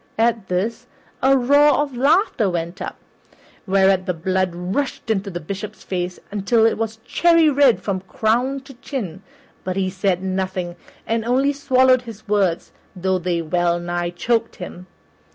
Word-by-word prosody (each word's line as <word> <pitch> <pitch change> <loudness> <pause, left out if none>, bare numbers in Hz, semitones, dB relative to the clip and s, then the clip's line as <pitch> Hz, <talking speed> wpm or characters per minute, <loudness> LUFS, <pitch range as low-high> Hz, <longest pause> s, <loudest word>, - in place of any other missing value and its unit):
At 225 -3 +1
this, 220 +7 -2 0.3
a 270 +1 +5
roar 285 +3 +5
of 290 -3 -1
laughter 275 - +2
went 170 +2 -4
up, - - -5 0.7
whereat 190 0 +3
the 180 - 0
blood 185 +2 0
rushed 200 +7 -2
into 200 -1 -1
the 175 -2 -5
Bishop's 195 +6 -7
face 180 -1 -3 0.3
till 225 +1 +4
it 225 - +3
was 225 0 -3
cherry 335 -3 +4
red 275 -4 +4
from 195 -2 -1
crown 240 +8 0
to 270 +1 -13
chin; 230 - -6 0.4
but 185 -1 -3
he 190 -1 0
said 190 -1 0
nothing 185 -2 -2 0.3
and 225 0 -1
only 265 +4 +2
swallowed 260 -2 +3
his 225 -3 -11
words, 195 -5 0 0.2
though 185 0 0
they 175 -1 -1
well 175 +1 +1
nigh 175 0 -2
choked 230 +6 -1
him. 180 0 -9
200 Hz, 155 wpm, -21 LUFS, 185-250 Hz, 0.7 s, a